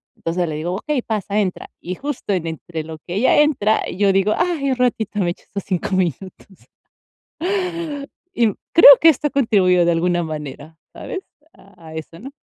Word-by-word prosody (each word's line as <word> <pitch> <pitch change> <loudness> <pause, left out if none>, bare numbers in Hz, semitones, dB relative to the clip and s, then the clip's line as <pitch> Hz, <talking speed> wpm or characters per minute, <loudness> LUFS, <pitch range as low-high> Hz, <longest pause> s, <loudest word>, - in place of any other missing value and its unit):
Entonces 170 +1 -2
le 155 - -4
digo: 170 +4 -3
"Okey, 280 +6 -2
pasa, 210 -1 -2
entra". 185 -3 -3
Y 180 +1 -5
justo 280 -6 -4
en 175 -3 -2
entre 160 0 -6
lo 160 0 -8
que 175 +3 -7
ella 260 +7 +4
entra, 235 -8 +2
yo 200 +1 +2
digo: 195 +2 +2
"Ay, 300 -7 0
un - - +1
ratito, 225 -4 -1
me 175 -3 +1
echo - - -11
estos 200 - -7
5 185 0 -2
minutos". 185 0 -1 2.0
Y 235 - +3 0.3
creo 330 - +10
que 330 - +7
esto 295 +1 -1
contribuyó 195 -10 +3
de 170 - +3
alguna 175 +1 +1
manera, 155 0 -7
¿sabes?, 385 - -6 0.3
a 170 -5 -15
eso, 160 +1 -8
¿no? 270 - -9
190 Hz, 175 wpm, -20 LUFS, 170-230 Hz, 2.0 s, creo